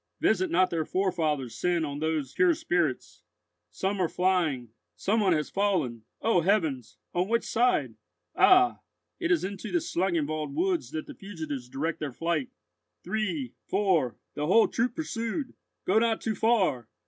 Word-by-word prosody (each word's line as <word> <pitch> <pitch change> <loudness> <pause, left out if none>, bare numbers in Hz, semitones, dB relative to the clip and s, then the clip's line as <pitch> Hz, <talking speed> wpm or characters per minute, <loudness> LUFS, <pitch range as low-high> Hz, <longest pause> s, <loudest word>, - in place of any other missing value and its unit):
Visit 185 -3 +2
not 185 +2 +3
their 165 -2 0
forefathers' 155 -9 -1
sin 175 -2 0
on 145 -1 -5
those 155 -2 -1
pure 365 -3 +4
spirits. 170 - -1 0.5
Some 190 - -2
are 175 - +1
flying. 170 -10 +1 0.3
Some 215 +4 +1
one 195 -4 +3
has 150 -2 -1
fallen! 160 - 0 0.2
O 225 -6 +3
heavens! 160 - 0 0.2
on 180 +1 +1
which 235 0 +2
side? 245 +2 +1 0.4
Ah! 370 0 +5 0.4
it 345 - -1
is 350 -3 +3
into 195 0 -5
the 355 - +2
Schlangenwald 155 - -1
woods 175 -6 0
that 155 +1 -5
the - - -9
fugitives 155 -10 -6
direct 155 +6 -2
their 145 -4 -4
flight. 170 - -1 0.5
Three—four—the 170 - -1
whole 225 +6 +5
troop 240 +2 -1
pursued! 260 -2 -3 0.3
Go 205 +4 +4
not 225 -1 +1
too 220 - -2
far! 185 - +1
180 Hz, 150 wpm, -28 LUFS, 150-215 Hz, 0.5 s, Ah